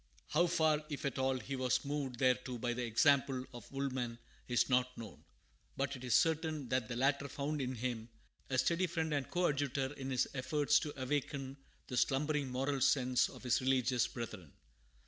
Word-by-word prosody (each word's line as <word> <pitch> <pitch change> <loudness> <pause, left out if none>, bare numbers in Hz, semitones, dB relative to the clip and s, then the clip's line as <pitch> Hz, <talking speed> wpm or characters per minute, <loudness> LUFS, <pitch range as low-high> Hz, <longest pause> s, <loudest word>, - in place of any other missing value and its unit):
How 170 +4 +3
far, 155 -2 +2
if 145 -2 -4
at 135 -1 -2
all, 130 0 +2
he 135 +2 -5
was 130 +2 +1
moved 140 -3 -3
thereto 125 0 +1
by 120 +1 -1
the 125 +1 -3
example 130 +2 +3
of 120 -3 -10
Woolman 130 -4 -2 0.3
is 120 -2 +2
not 125 0 +1
known, 115 -2 -9 0.5
but 140 +1 -1
it 130 - -10
is 125 - +2
certain 155 -4 +1
that 130 -2 0
the 120 - -4
latter 140 +3 +1
found 145 +2 -3
in 130 0 -2
him 120 -1 -3 0.4
a 130 - 0
steady 170 +7 +2
friend 160 -2 -1
and 140 -2 -1
coadjutor 145 -5 0
in 135 -2 -6
his 130 -2 +1
efforts 145 +2 +2
to 145 -3 -6
awaken 135 0 -2 0.3
the 125 - -4
slumbering 145 +2 +1
moral 135 +2 -1
sense 125 -1 +3
of - - -12
his 125 0 +2
religious 130 -2 +2
brethren. 95 - -7
135 Hz, 180 wpm, -35 LUFS, 125-145 Hz, 0.5 s, How